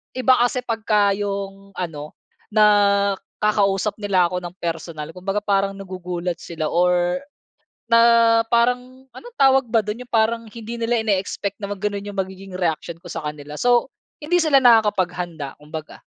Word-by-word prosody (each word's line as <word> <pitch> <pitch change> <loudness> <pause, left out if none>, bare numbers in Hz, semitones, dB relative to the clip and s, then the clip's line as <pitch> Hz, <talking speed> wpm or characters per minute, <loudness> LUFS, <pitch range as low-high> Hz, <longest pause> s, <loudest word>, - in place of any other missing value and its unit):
iba 255 0 +3
kasi 245 +1 +1
'pagka 215 -3 +1
yung 195 -1 -5
ano 155 -5 -6 0.4
nakakausap 200 -1 +2
nila 190 -4 +2
ako 180 - -1
ng 175 +1 -7
personal. 165 -2 -5
Kumbaga 195 +3 -2
parang 195 -1 +1
nagugulat 180 -2 -5
sila 160 -2 -4
or 180 0 +2 0.7
na 230 0 +5 0.5
parang 250 +2 0
ano 440 - -11
tawag 270 -2 +4
ba 225 - +3
do'n 215 +3 -3
yung 245 - -16
parang 230 +1 +2
hindi 230 +1 -8
nila 230 +1 +1
ini-expect 200 -1 -2
na 200 - -4
mag 205 - -4
gano'n 205 -1 -2
yung 205 -1 -8
magiging 190 0 -5
reaksiyon 170 -1 -2
ko 175 - -17
sa 165 -1 -5
kanila. 150 0 -8
So, 245 +1 +3 0.3
hindi 345 +4 +1
sila 300 -4 +5
nakakapaghanda 180 - +2
kumbaga. 155 +1 -9
200 Hz, 150 wpm, -21 LUFS, 180-230 Hz, 0.7 s, na